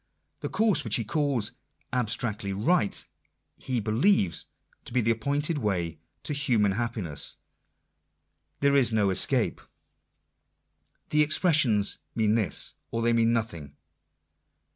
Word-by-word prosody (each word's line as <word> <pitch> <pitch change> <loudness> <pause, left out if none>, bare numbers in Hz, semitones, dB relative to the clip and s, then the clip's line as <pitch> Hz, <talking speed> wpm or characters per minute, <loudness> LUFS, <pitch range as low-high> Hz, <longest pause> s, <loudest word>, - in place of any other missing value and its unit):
The - - -4
course 220 -3 +2
which 110 -3 0
he 115 - -1
calls 130 -3 0 0.2
" 145 - -41
abstractedly 110 -4 -1
right," 105 - +1 0.5
he 125 -2 -2
believes 110 - +1 0.4
to - - -10
be 130 - +2
the 115 +1 +2
appointed 145 +7 -1
way 85 - -2 0.2
to 150 - -3
human 120 -8 +1
happiness. 105 - 0 1.2
There 140 0 +3
is 130 -4 +3
no 105 -3 +2
escape. 95 - +1 1.5
The 150 - +3
expressions 150 - +3 0.2
mean 110 -2 +2
this, 110 -4 0 0.2
or 115 0 -2
they 120 0 +3
mean 115 0 +3
nothing. 85 -12 -3
115 Hz, 120 wpm, -27 LUFS, 105-140 Hz, 1.5 s, There